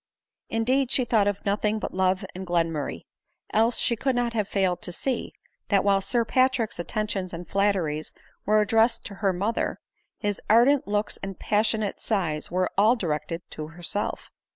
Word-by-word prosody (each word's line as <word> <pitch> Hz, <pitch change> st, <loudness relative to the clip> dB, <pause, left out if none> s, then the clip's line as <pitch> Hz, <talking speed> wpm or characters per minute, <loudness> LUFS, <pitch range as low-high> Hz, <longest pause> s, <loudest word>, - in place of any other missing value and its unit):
Indeed 250 Hz, +4 st, +1 dB
she 255 Hz, -, +2 dB
thought 215 Hz, -4 st, +3 dB
of 205 Hz, -1 st, -2 dB
nothing 210 Hz, +1 st, +1 dB
but -, -, -4 dB
love 185 Hz, 0 st, +1 dB
and 185 Hz, 0 st, -7 dB
Glenmurray; 165 Hz, -4 st, -1 dB, 0.5 s
else, 225 Hz, +2 st, +3 dB
she 235 Hz, -, +2 dB
could 265 Hz, +3 st, 0 dB
not 240 Hz, -1 st, 0 dB
have 210 Hz, -3 st, 0 dB
failed 185 Hz, -4 st, 0 dB
to -, -, -4 dB
see, 255 Hz, +8 st, -2 dB, 0.4 s
that 200 Hz, -2 st, +3 dB
while 195 Hz, -1 st, +3 dB
Sir 235 Hz, +3 st, 0 dB
Patrick's 255 Hz, -3 st, +1 dB
attentions 195 Hz, 0 st, -3 dB
and 175 Hz, +1 st, -8 dB
flatteries 185 Hz, -7 st, 0 dB, 0.3 s
were 215 Hz, +1 st, +4 dB
addressed 225 Hz, +3 st, +2 dB
to 205 Hz, -, -6 dB
her 195 Hz, -2 st, +3 dB
mother, 200 Hz, +5 st, -1 dB, 0.4 s
his 205 Hz, -2 st, -2 dB
ardent 245 Hz, +5 st, +5 dB
looks 205 Hz, +1 st, -1 dB
and 195 Hz, -1 st, -7 dB
passionate 215 Hz, -1 st, 0 dB
sighs 170 Hz, -8 st, -1 dB
were 185 Hz, +1 st, 0 dB
all 220 Hz, +4 st, +6 dB
directed 165 Hz, -3 st, -3 dB
to 155 Hz, -1 st, -6 dB
herself. 175 Hz, +5 st, -3 dB
205 Hz, 165 wpm, -26 LUFS, 185-225 Hz, 0.5 s, all